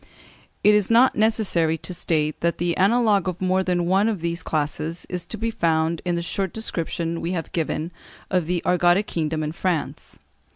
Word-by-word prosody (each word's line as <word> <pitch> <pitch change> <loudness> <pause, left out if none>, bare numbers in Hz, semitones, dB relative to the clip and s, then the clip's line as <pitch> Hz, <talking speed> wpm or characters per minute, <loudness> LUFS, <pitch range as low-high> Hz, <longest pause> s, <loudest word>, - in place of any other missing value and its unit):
It 210 - +6
is 210 -2 +2
not 235 +3 +5
necessary 210 -7 +2
to 180 - -7
state 155 -3 -1
that 170 0 0
the 175 -1 0
analogue 205 -1 +3
of 180 - -6
more 185 0 +1
than 180 -2 0
one 195 +5 +3
of 210 -5 -2
these 170 +1 -2
classes 155 +2 -3
is 180 -1 -4
to 220 - -6
be 230 +2 -2
found 165 -5 0
in 175 -1 0
the 170 - -2
short 190 +1 -3
description 170 -5 -3
we 175 - -2
have 165 -3 -4
given 160 0 -2 0.4
of 180 -4 +1
the 175 -1 -1
Argotic 180 +2 +3
kingdom 155 -3 -2
in 150 - -2
France. 170 -1 -3
175 Hz, 190 wpm, -23 LUFS, 165-195 Hz, 0.4 s, It